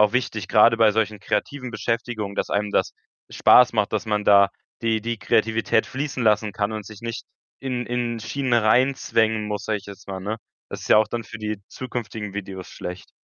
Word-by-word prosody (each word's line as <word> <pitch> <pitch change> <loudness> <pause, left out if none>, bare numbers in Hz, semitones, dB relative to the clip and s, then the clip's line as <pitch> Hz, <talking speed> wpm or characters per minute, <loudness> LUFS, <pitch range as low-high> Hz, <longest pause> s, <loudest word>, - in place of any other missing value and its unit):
auch 105 0 +5
wichtig, 125 -5 -1
grade 115 +1 +6
bei 110 -2 +5
solchen 105 -1 -1
kreativen 125 +5 -2
Beschäftigungen, 115 -4 -3
dass - - -2
einem 105 0 -1
das - - +1 0.4
Spaß 125 -1 +6
macht, 105 -1 +1
dass 110 +1 -1
man 105 -1 0
da 100 -1 +6 0.3
die 110 -1 +1
die 115 +1 -3
Kreativität 110 0 +2
fließen 135 -3 -3
lassen 105 0 +3
kann 105 +2 -1
und 105 -2 -5
sich 110 +1 -11
nicht 115 0 -5 0.4
in 125 -2 -3
in 120 -1 -2
Schienen 125 +4 -1
reinzwängen 110 -2 +2
muss, 105 -1 -4
sage 110 -1 0
ich 100 - -16
jetzt 100 0 -12
mal, 95 - -4
ne? 105 +4 -3 0.3
Das - - -7
ist - - -8
ja - - +7
auch 110 0 +5
dann 115 0 -3
für 115 - -10
die 105 -2 -4
zukünftigen 110 -5 -6
Videos 95 -2 -6
schlecht. 90 +1 -8
110 Hz, 200 wpm, -23 LUFS, 105-120 Hz, 0.4 s, ja